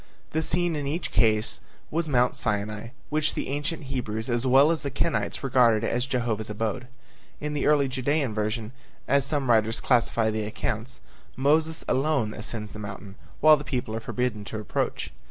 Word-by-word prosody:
The 160 - 0
scene 175 +1 +2
in 145 -2 -3
each 165 +5 -3
case 110 -1 +2 0.3
was 165 +1 0
Mount 125 -3 +3
Sinai, 105 +2 -1 0.2
which 155 0 +2
the - - -3
ancient 145 +3 -2
Hebrews 120 -4 -3
as 120 +2 0
well 135 +5 +6
as 165 - -1
the 140 - -3
Kenites 110 -5 -1
regarded 120 -4 +4
as 120 +2 0
Jehovah's 115 -5 -1
abode. 110 +4 -3 0.5
In 150 0 -3
the 145 - 0
early 145 -2 +4
Judean 135 0 0
version, 110 +1 -2 0.4
as 140 +1 +4
some 140 -2 0
writers 115 -1 +3
classify 115 -3 +2
the 110 0 -2
accounts, 110 +3 -4 0.3
Moses 155 +4 +2
alone 135 -6 +1
ascends 105 -1 -6
the 105 - -9
mountain, 100 -1 -7 0.3
while 155 0 +8
the 145 - -7
people 125 -5 -3
are - - -2
forbidden 115 -2 -2
to 110 - -5
approach. 100 -7 -2
125 Hz, 175 wpm, -26 LUFS, 110-145 Hz, 0.5 s, while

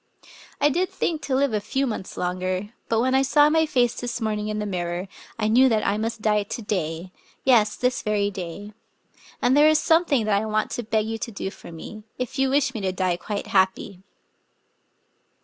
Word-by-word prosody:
I 290 - +4
did 360 +6 0
think 320 -3 -2
to 270 - -1
live 275 -2 +2
a 210 - +1
few 265 +7 -1
months 215 -6 -5
longer; 185 +2 -2 0.2
but 225 0 +2
when 260 +1 +1
I 265 - +4
saw 290 +2 +4
my 320 0 +3
fiice 245 -5 +2
this 245 0 -3
morning 215 -2 -2
in 215 0 -2
the 210 - -2
mirror, 175 -1 -3 0.3
I 215 -2 0
knew 255 +4 +5
that 220 -2 +1
I 200 +1 +1
must 225 0 -3
die 210 -1 +3
to 205 +3 -5
day, 175 -3 -3 0.2
— - - -28
yes, 225 -5 +4
this* 250 0 0
very 205 -1 0
day. 190 +3 -7 0.7
And 250 +2 +4
there 295 +1 +6
is 310 - +4
something 320 -8 +3
that 205 -1 +2
I 220 - -3
want 215 0 0
to - - -2
beg 215 -1 0
you 225 0 -4
to 230 - -4
do 195 -2 -5
for - - -12
me 215 +6 -9
— - - -45
if 250 +2 -4
you 270 0 +3
wish 275 -1 +2
me 220 - -4
to 190 -1 0
die 185 -1 0
quite 200 +3 -5
happy." 190 0 0
215 Hz, 220 wpm, -24 LUFS, 200-260 Hz, 0.7 s, there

